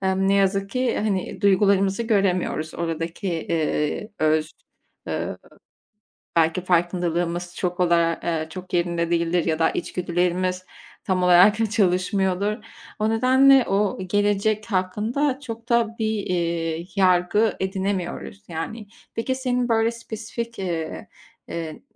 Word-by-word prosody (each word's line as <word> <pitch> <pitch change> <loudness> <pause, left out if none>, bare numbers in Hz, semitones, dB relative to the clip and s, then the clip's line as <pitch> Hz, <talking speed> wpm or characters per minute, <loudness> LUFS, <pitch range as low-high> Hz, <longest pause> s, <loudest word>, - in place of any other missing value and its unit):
ne 195 +1 +2
yazık 195 0 +2
ki 255 +2 0
hani 195 -3 -2
duygularımızı 200 +1 +3
göremiyoruz. 185 -7 0
Oradaki, 165 +3 -3
eee, 160 +2 -1
öz, 155 0 +2 0.6
eee, - - -3 1.0
belki 165 +2 +3
farkındalığımız 175 0 0
çok 180 -1 -2
olar 170 -1 +3
eee, 160 -2 -2
çok 185 +2 -9
yerinde 170 -1 0
değildir 170 0 +1
ya 160 -2 0
da 165 - +3
içgüdülerimiz 180 +1 -1 0.4
tam 185 -1 0
olarak 195 +5 +5
çalışmıyordur. 190 +1 +1 0.4
O 215 0 +1
nedenle 260 +3 +5
o 200 +1 +1
gelecek 205 +2 +1
hakkında 220 +9 0
çok 230 -3 -8
da 230 -1 +2
bir, 220 -1 0
eee, 170 -2 -1
yargı 190 +3 +3
edinemiyoruz 190 +1 -3
yani. 180 +7 -5 0.3
Peki 245 +3 -1
senin 250 -1 -1
böyle 225 0 +3
spesifik, 230 0 -6
eee, 170 -4 -4 0.4
eee, 160 -2 -6
185 Hz, 115 wpm, -23 LUFS, 170-215 Hz, 1.0 s, olarak